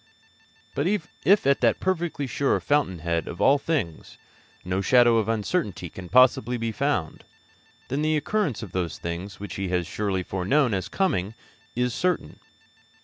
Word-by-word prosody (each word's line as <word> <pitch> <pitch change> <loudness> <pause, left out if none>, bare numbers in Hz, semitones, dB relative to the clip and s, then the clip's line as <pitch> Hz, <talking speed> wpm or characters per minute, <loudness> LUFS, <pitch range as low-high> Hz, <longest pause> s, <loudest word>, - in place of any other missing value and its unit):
But 145 - 0
if 200 0 +1
at 140 0 +3
that 115 -3 +3
perfectly 170 -6 -1
sure 135 +2 0
Fountain 145 -11 +1
head 85 -1 -1
of 85 - -7
all 140 +1 +5
things 135 - -3 0.5
no 90 +2 -1
shadow 120 +2 +5
of 110 -1 0
uncertainty 105 - -2
can 90 -2 -9
possibly 125 -1 +4
be 115 -1 -2
found, 140 - -2 0.6
then 140 +3 -2
the 155 0 +2
occurrence 150 - -1
of 100 - -8
those 90 -3 -2
things 90 +5 -6
which 100 -2 -7
He 100 -1 -2
has 90 -1 0
surely 95 -2 -2
foreknown 110 +9 +1
as 95 -1 -2
coming 110 - 0 0.4
is 125 0 0
certain. 180 - -1
115 Hz, 155 wpm, -25 LUFS, 95-145 Hz, 0.6 s, all